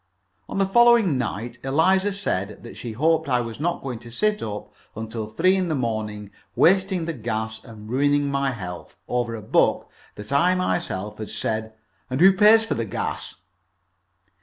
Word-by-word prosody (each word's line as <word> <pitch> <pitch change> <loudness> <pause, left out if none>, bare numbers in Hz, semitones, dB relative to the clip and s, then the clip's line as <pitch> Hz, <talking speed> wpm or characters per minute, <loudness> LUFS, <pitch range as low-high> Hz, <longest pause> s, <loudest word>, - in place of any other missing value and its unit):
On - - -4
the 195 - +3
following 235 - +5
night 120 0 -4
Eliza 185 +9 +2
said 105 - -3
that 115 - -10
she 115 -2 -6
hoped 160 +4 +1
I 125 -1 +3
was 115 0 -5
not 170 +3 -2
going 125 -4 -5
to 120 - -12
sit 210 - 0
up 105 -1 -6 0.2
until 110 0 -5
three 185 - +2
in 185 -2 0
the 160 - -1
morning, 110 -4 -3 0.2
wasting 190 -1 +3
the 165 - -3
gas 110 -3 -4
and 110 -2 -12
ruining 145 +4 +2
my 140 0 0
health, 90 -8 -7
over 120 -2 -1
a 110 - -8
book - - +1 0.2
that 105 +5 -9
I 175 +6 +3
myself 105 - -2
had 110 - -5
said 110 0 -3 0.3
"And 130 +1 -2
who 190 +3 +7
pays 215 +3 +6
for 225 - -2
the - - -2
gas?" - - -4
130 Hz, 175 wpm, -23 LUFS, 110-180 Hz, 0.3 s, who